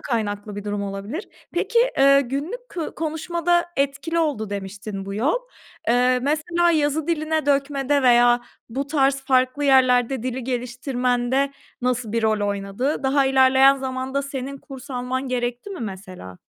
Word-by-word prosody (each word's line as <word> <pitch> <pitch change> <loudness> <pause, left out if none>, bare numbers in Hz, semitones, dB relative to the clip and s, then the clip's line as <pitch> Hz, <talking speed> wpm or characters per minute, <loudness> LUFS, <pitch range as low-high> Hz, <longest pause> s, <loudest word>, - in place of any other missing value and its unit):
kaynaklı 205 -3 -3
bir 205 - -6
durum 205 -1 -2
olabilir. 200 - -5 0.2
Peki, 400 +7 +1 0.2
ııı, 275 0 +7
günlük 300 - -4
kı 335 -3 -5
konuşmada 340 +2 0
etkili 280 +4 -1
oldu, 275 -10 -1
demiştin, 195 0 -5
bu 195 0 -5
yol. 250 +10 +1 0.5
Eee, 250 +1 +3
mesela 325 +5 +1
yazı 305 -1 +1
diline 315 -2 -1
dökmede 280 0 +1
veya 240 -1 +5 0.3
bu 270 +4 -3
tarz 275 -2 +2
farklı 260 +2 +2
yerlerde 255 -2 +4
dili 255 0 -3
geliştirmende 250 +1 -1 0.3
nasıl 250 -3 -1
bir 230 - 0
rol 215 -2 +1
oynadı? 200 +9 -2
Daha 270 +1 +3
ilerleyen 265 +1 +5
zamanda 265 +1 -3
senin 275 0 -5
kurs 270 -2 -11
alman 255 +1 -3
gerekti 245 +6 -3
mi 385 - -6
mesela? 185 - -8
265 Hz, 140 wpm, -23 LUFS, 240-285 Hz, 0.5 s, ııı